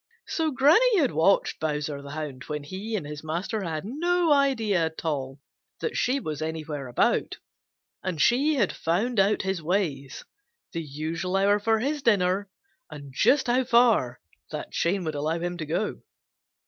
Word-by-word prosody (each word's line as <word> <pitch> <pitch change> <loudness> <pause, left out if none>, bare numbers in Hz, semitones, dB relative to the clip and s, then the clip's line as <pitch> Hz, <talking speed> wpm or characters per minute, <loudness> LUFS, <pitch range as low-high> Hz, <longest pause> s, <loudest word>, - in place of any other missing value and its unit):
So 320 -1 -1
Granny 320 - +4
had 285 -8 +3
watched 165 +6 +2
Bowser 150 -2 -2
the 140 - -10
Hound 145 -3 -6
when 150 -1 -4
he 195 +9 -5
and 185 - -3
his 150 +1 -7
master 175 +8 -3
had 165 -2 -4
no 335 - +2
idea 225 - +2
at 160 +1 -9
all 135 -3 -2 0.4
that 460 - -3
she 260 +3 +1
was 155 - -5
anywhere 155 -3 -4
about, 120 - +1 0.6
and 185 -4 -3
she 275 - +3
had 210 -9 +1
found 205 +8 0
out 195 +2 +3
his 190 -2 -2
ways, 155 -6 -2 0.5
the 165 - -3
usual 160 +5 -4
hour 200 +1 +3
for 225 +2 +2
his 285 +6 -1
dinner 200 -3 +2 0.4
and 140 -2 -10
just 275 - +4
how 250 +1 +2
far 235 - +3 0.3
that - - -6
chain 185 +3 0
would 160 -2 -3
allow 155 +3 -1
him 175 +1 -3
to 155 - -4
go. 170 +7 -2
185 Hz, 165 wpm, -26 LUFS, 155-235 Hz, 0.6 s, Granny